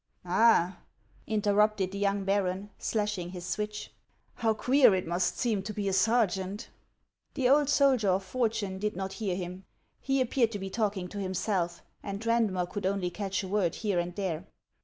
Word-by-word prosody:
"All!" 185 -1 +4 0.5
interrupted 210 -2 +2
the 200 - -5
young 200 0 +1
baron, 195 0 -1
slashing 210 -5 -1
his 180 -1 -7
switch, 210 +2 -4 0.2
" - - -41
how 225 -1 +2
queer 255 -2 +5
it 185 - -2
must 175 +2 0
seem 220 -5 0
to 210 - -6
be 205 -1 -2
a 195 - 0
sergeant." 200 -1 +1 0.6
The 265 -4 +2
old 285 +2 +4
soldier 270 -7 +4
of 190 +1 +2
fortune 210 -3 -1
did 210 +1 -2
not 190 +1 -4
hear 195 -4 0
him; 180 +1 -6 0.4
he 270 0 0
ap 255 -2 0
peared 235 -4 +2
to - - -2
be 190 0 -5
talking 205 -5 -1
to 205 - -6
himself, 185 -2 -2 0.2
and 200 0 -5
Eaudmer 225 -5 +1
could 195 +1 -3
only 190 -2 -1
catch 195 +1 -3
a - - -5
word 185 -4 0
here 205 -5 0
and 175 0 -3
there. 185 -3 -3
200 Hz, 180 wpm, -29 LUFS, 185-215 Hz, 0.6 s, queer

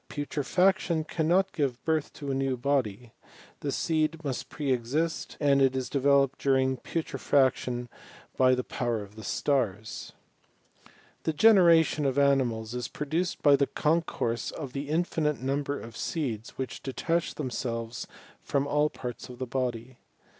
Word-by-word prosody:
Putrefaction 165 +4 +1
cannot 170 +4 +1
give 135 -6 -2
birth 160 -2 0
to 140 -2 -5
a - - 0
new 135 -1 0
body: 120 -4 -1 0.5
the 145 - -2
seed 160 +1 0
must 135 -4 -3
pre 145 -3 -2
exist, 145 +7 -1
and 140 -2 +4
it 135 -1 +4
is 130 -1 -3
developed 140 -1 +3
during 130 -1 +2
putre 165 +4 -4
faction 125 -3 +1 0.5
by 130 -1 +5
the 125 - -2
power 120 -4 -2
of 100 +1 -14
the 110 - -9
stars. 110 -8 -1 1.1
The 160 - -1
generation 165 -5 +5
of 135 0 -1
animals 125 -6 +2
is 125 -2 -3
produced 160 +7 -2
by 145 -1 +7
the 140 0 +2
concourse 150 -7 0
of 140 -5 -7
the 140 +1 -4
infinite 155 -4 0
number 140 +2 -1
of 115 0 -10
seeds 120 -9 -3
which 130 -1 -4
detach 165 +5 -1
themselves 120 -4 -4 0.3
from 140 -1 0
all 150 +1 +2
parts 125 -2 -7
of 125 - -9
the 130 - -3
body. 125 -1 -3
140 Hz, 145 wpm, -28 LUFS, 125-155 Hz, 1.1 s, by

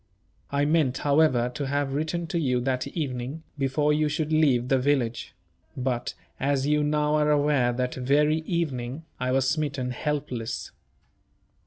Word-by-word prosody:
I 140 +1 +1
meant, 150 -4 +2
however, 140 -5 +3
to 140 +1 -3
have 140 0 -1
written 160 +4 -1
to 170 +1 -2
you 125 -5 +1
that 130 0 -1
evening, 140 0 -4
before 145 +2 +1
you 150 0 +1
should 155 +1 -1
leave 135 -6 +3
the 135 0 +3
village; 125 -5 0 0.4
but 125 -2 -2 0.2
(as 135 0 +1
you 150 +1 +2
now 150 0 +1
are 150 0 +3
aware) 145 -4 +3
that 125 +1 -2
very 145 +4 +2
evening, 155 -4 -3
I 125 0 -1
was 130 0 +2
smitten 135 -3 -1
helpless. 130 -4 -3
140 Hz, 150 wpm, -26 LUFS, 125-150 Hz, 0.4 s, however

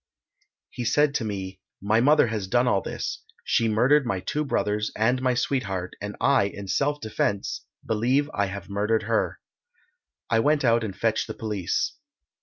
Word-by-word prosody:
He 125 - -5
said 145 +4 +3
to 130 - -1
me 95 -3 -5 0.2
"My 110 +3 +2
mother 145 +3 +5
has 110 -4 -3
done 120 +5 +2
all 100 -5 +2
this - - -5 0.2
she 115 - +2
murdered 125 +7 +4
my 115 -7 -1
two 150 +11 -2
brothers 105 -6 -1
and 125 +4 +1
my 130 -1 +1
sweetheart, 95 -8 -2
and 105 0 -5
I, 135 -7 +4
in 100 0 -6
self 145 +8 0
defence, 105 -3 -2 0.2
believe 125 +6 +1
I 100 -1 0
have 95 -1 -7
murdered 105 +3 0
her." 110 +1 0 0.9
I 115 - +2
went 145 +3 +2
out 115 -1 +3
and 100 -4 -4
fetched - - 0
the - - -6
police. 105 -5 -2
110 Hz, 170 wpm, -25 LUFS, 100-130 Hz, 0.9 s, mother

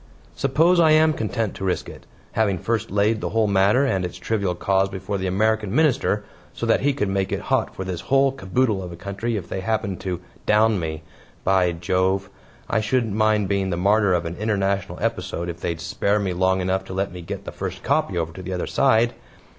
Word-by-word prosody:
"Suppose 160 +7 +3
I 160 -2 +6
am 155 0 +5
content 110 -3 -2
to - - -8
risk 95 -2 -1
it - - -12 0.2
having 105 -4 +1
first 115 +4 -2
laid 105 +3 +1
the - - -2
whole 115 0 +2
matter 100 +6 +3
and 95 -8 0
its 90 - -5
trivial 100 -5 -1
cause 95 +2 +1
before 95 +1 -4
the 95 - -2
American 105 +2 +1
Minister, 135 -8 +2 0.3
so - - -4
that 115 - +3
he 145 - +3
could 130 -7 -1
make 95 0 -1
it - - -1
hot - - +1
for 95 - -4
this 90 -2 -4
whole 135 0 +3
caboodle 110 -2 0
of 90 -1 -7
a - - -7
country 100 +6 -3
if 90 -4 -6
they 95 - -4
happened 105 -2 -2
to 90 -3 -3 0.3
'down 110 -1 +4
me.' 80 -1 -4 0.4
By 95 -2 +3
Jove! 95 +3 0 0.4
I 110 - +1
shouldn't 115 0 0
mind 110 -1 +2
being 100 -1 0
the 85 - -1
martyr 100 +1 +3
of 85 -1 -1
an 85 +1 -5
international 100 -3 -1
episode 95 -6 -2
if 85 0 -7
they'd 85 -1 -2
spare 100 +4 0
me 100 -3 -1
long 95 +1 +2
enough 95 +1 0
to 95 - -7
let 95 +1 -1
me 90 0 -8
get 85 - -6
the - - -5
first - - -6
'copy' 95 - +1
over 80 -1 -2
to 95 - -8
the 95 +1 -5
other 90 - -2
side." 120 -3 +3
100 Hz, 220 wpm, -23 LUFS, 95-110 Hz, 0.4 s, I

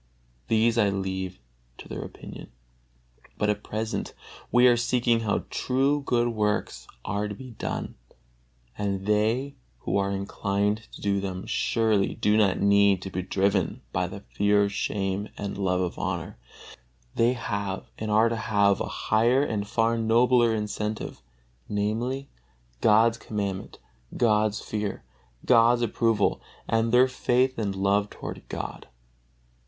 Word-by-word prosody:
These 115 +1 +3
I 105 -2 +4
leave 95 -1 -3 0.4
to - - -11
their - - -5
opinion. - - -10 0.9
But 105 0 +2
at 105 0 -5
present 110 +1 -4 0.4
we 120 +1 +5
are 125 -1 +7
seeking 120 0 +2
how 110 -3 -1
true 135 +3 +1
good 120 -2 +1
works 105 -2 -1 0.2
are 105 +1 -1
to 105 - -6
be 130 +3 -10
done, 115 - -4 0.8
and 100 -2 -2
they 110 +7 +1 0.2
who - - -1
are 100 0 +1
inclined 100 +2 -1
to - - -10
do 100 -1 +1
them 95 -1 -4
surely 110 -4 +1
do 105 0 +2
not 105 -3 +3
need 100 -2 +4
to 95 - -6
be 90 - -2
driven 95 +1 0
by - - 0
the - - -8
fear 100 +11 +2
of 100 0 -1
shame 100 0 -2
and 100 -1 -4
the - - -5
love 90 -1 +1
of 90 -2 -3
honor; - - -3 0.8
they 115 +2 +3
have, 100 -5 -3
and 110 - -3
are 110 +2 +4
to 115 - -1
have 100 -2 +2
a - - -2 0.2
higher 120 +5 +4
and 105 -7 -2
far 115 +1 +1
nobler 120 +1 +4
incentive, 105 0 -4 0.5
namely, 115 +7 -1 0.5
God's 115 +2 +4
commandment, 100 -3 -4 0.4
God's 110 -2 +2
fear, 105 -2 -4 0.4
God's 120 0 +5
approval, 115 -2 +1 0.3
and 115 0 +1
their 125 +2 +6
faith 130 0 +1
and 100 -3 -1
love 100 +1 +1
toward - - -7
God. - - -6
105 Hz, 145 wpm, -26 LUFS, 100-115 Hz, 0.9 s, are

